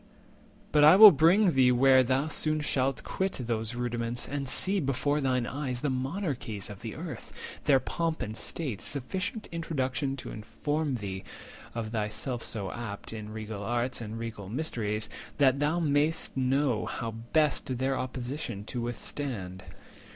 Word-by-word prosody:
But 150 -1 +5
I 155 +4 +9
will 210 +1 +12
bring 175 +6 +5
thee 130 -3 +5
where 130 +1 +6
thou 130 +3 +1
soon 155 0 +1
shalt 135 -3 0
quit 190 0 -2
Those 115 -2 -3
rudiments, 120 -1 -1
and 140 -2 -3
see 195 +7 +1
before 145 0 0
thine 130 -2 +1
eyes 130 -2 -3
The 145 - 0
monarchies 130 - -3
of 100 - -10
the 115 -2 -6
Earth, 165 0 -7 0.3
their 140 -3 +5
pomp 165 +3 -2
and 110 - -5
state— 130 - -2
Sufficient 185 - -3
introduction 140 -4 -1
to - - -7
inform 145 +7 -2
Thee, 95 -4 -5 0.5
of 115 -2 -3
thyself 110 +3 -2
so 100 -5 -3
apt, 115 -3 -6
in 110 -1 -7
regal 110 -1 -6
arts, 120 +4 0
And 110 0 -5
regal 115 -4 -6
mysteries; 110 -5 -1 0.3
that 140 -1 +4
thou 150 +4 +1
may'st 155 +1 +1
know 130 -2 +1
How 115 -1 -3
best 130 +3 0
their 135 +2 0
opposition 125 -4 -4
to 120 +3 -4
withstand." 115 -5 -4
130 Hz, 150 wpm, -29 LUFS, 115-150 Hz, 0.5 s, will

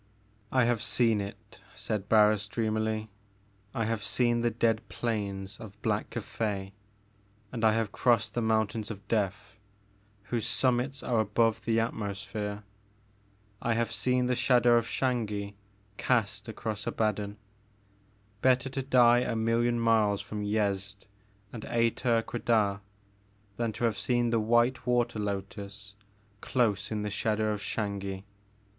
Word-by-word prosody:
"I 130 -2 +4
have 120 -2 +1
seen 115 -1 +2
it," 100 0 -9 0.2
said 105 -2 -3
Barris 105 -1 +4
dreamily. 110 0 -1 0.6
"I 115 - 0
have 110 -1 -2
seen 120 +4 +2
the 120 - +2
dead 115 -1 +1
plains 100 -3 -3
of 105 -3 -11
Black - - 0
Cathay 100 -3 -3 0.8
and 115 -2 -4
I 110 -1 +5
have 110 -2 0
crossed 115 -1 +2
the 120 - -1
mountains 110 0 0
of 100 -2 -8
Death, 105 +1 -2 0.6
whose 115 +2 -2
summits 125 +4 +1
are 120 -2 +1
above 110 +1 +1
the 115 -1 +2
atmosphere. 105 -1 -3 1.0
I 115 -1 +1
have 115 -1 0
seen 125 0 +1
the 125 0 +1
shadow 120 -1 +4
of 115 -1 +2
Xangi 105 -7 -1 0.4
cast 105 -4 0
across 110 -2 -4
Abaddon. 105 -1 -1 1.0
Bet 130 -1 +4
ter 135 - -6
to 135 - -2
die 120 -2 +5
a 120 -1 -1
million 115 +1 +1
miles 110 -3 +3
from 105 -1 -5
Yezd 100 -1 -1 0.5
and 115 -3 -7
Ater 115 0 +1
Quedah 110 -5 +1 0.8
than 115 -1 0
to 115 - -5
have 110 -4 +1
seen 120 +1 +1
the 115 - +3
white 120 +3 +2
water 120 -3 +1
lotus 100 0 -5 0.5
dose 110 -6 +1
in 105 -1 -2
the 105 - -3
shadow 110 +1 0
of 105 - -5
Xangi 100 -3 -3
110 Hz, 140 wpm, -29 LUFS, 105-120 Hz, 1.0 s, I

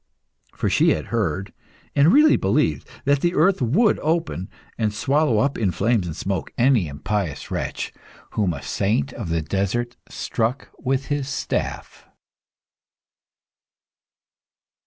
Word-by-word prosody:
For - - -1
she - - +4
had 75 - -4
heard, 100 -3 -1 0.4
and 145 +4 +6
really 300 +5 +6
believed, - - +1 0.2
that 140 0 +3
the 175 0 +1
earth 180 +2 +3
would 180 - +3
open 160 - -1 0.3
and 110 -2 0
swallow 140 +3 +2
up 140 +5 +1
in 105 -4 +2
flames 100 0 +1
and 80 - -5
smoke 95 +1 -3
any 120 -7 +3
impious 80 +3 -3
wretch - - -3 0.4
whom 100 -5 +1
a 70 -3 -6
saint 95 -9 0
of - - -5
the 80 -1 0
desert 100 +8 -1
struck 115 +4 -2
with 135 +1 -1
his 140 -2 -2
staff. 140 - -3
115 Hz, 130 wpm, -23 LUFS, 95-140 Hz, 0.4 s, and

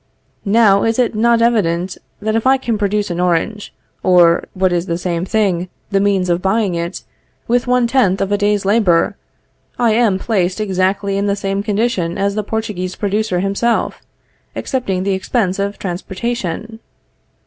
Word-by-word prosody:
Now 205 -2 +5
is 225 0 +1
it 245 -2 +1
not 230 +1 +3
evident, 185 -6 +1 0.3
that 220 +1 0
if 225 +3 +1
I 265 +1 +5
can 240 -3 -2
produce 205 -1 0
an 175 - -3
orange, 180 +4 -1 0.3
or, 175 -2 +4
what 185 -1 +1
is 175 +1 -1
the 170 - -1
same 175 -1 -2
thing, 190 -4 0 0.2
the 195 - +2
means 195 -2 +1
of 175 0 0
buying 195 0 +1
it, 170 0 -4 0.4
with 245 +1 +1
one 250 -1 +3
tenth 235 -6 +2
of 195 0 -1
a 205 - +2
day's 205 -1 +1
labor, 195 -5 +2 0.6
I 235 -2 +3
am 215 -3 +3
placed 190 -2 -1
exactly 195 0 0
in 200 - 0
the 200 - +1
same 195 0 -2
condition 205 -5 -1
as 200 0 0
the 215 - -1
Portuguese 205 -4 -3
producer 205 -3 -1
himself, 200 +5 0 0.5
excepting 195 -9 -2
the 200 0 0
expense 190 0 -1
of 200 +1 -1
the - - -24
transportation? 200 +3 -4
200 Hz, 170 wpm, -17 LUFS, 185-220 Hz, 0.6 s, Now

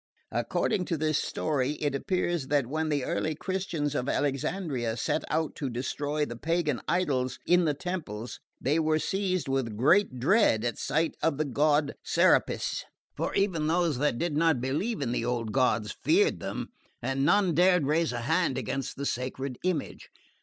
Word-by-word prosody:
According 185 -3 0
to 165 - -1
this 155 -1 +1
story 145 -3 -1
it 145 -2 -2
appears 175 -1 -1
that 145 -2 +2
when 155 +5 -2
the 145 -3 0
early 155 0 -1
Christians 175 -4 -2
of 130 -2 -1
Alexandria 135 -4 -1
set - - 0
out 160 +1 0
to 140 - -2
destroy 145 +5 -2
the 120 - -7
pagan 155 -1 -1
idols 140 -8 0
in 180 0 +4
the 150 -2 +1
temples 145 - -5 0.2
they 145 +5 +1
were 155 -1 +2
seized 185 0 -1
with 130 -5 -1
great 160 - +3
dread 130 - +3
at 120 - -2
sight 160 +4 0
of 160 -4 +1
the 155 - 0
god 145 +1 +2
Serapis; - - +2 0.3
for - - -2
even 180 -6 +1
those 165 -4 +1
that 145 -4 +1
did 170 +2 -1
not 160 -3 +3
believe 145 - -1
in 120 - -1
the 120 - -1
old 120 -2 -2
gods 115 -4 +1
feared 400 +7 +3
them, - - -5 0.3
and 135 +1 0
none 185 +3 +3
dared 180 -1 +4
raise 160 +2 +1
a 120 -1 -3
hand 160 +1 +1
against 130 +2 -3
the 140 - -3
sacred 130 0 -3
image. 180 -5 -2
150 Hz, 170 wpm, -28 LUFS, 130-170 Hz, 0.3 s, in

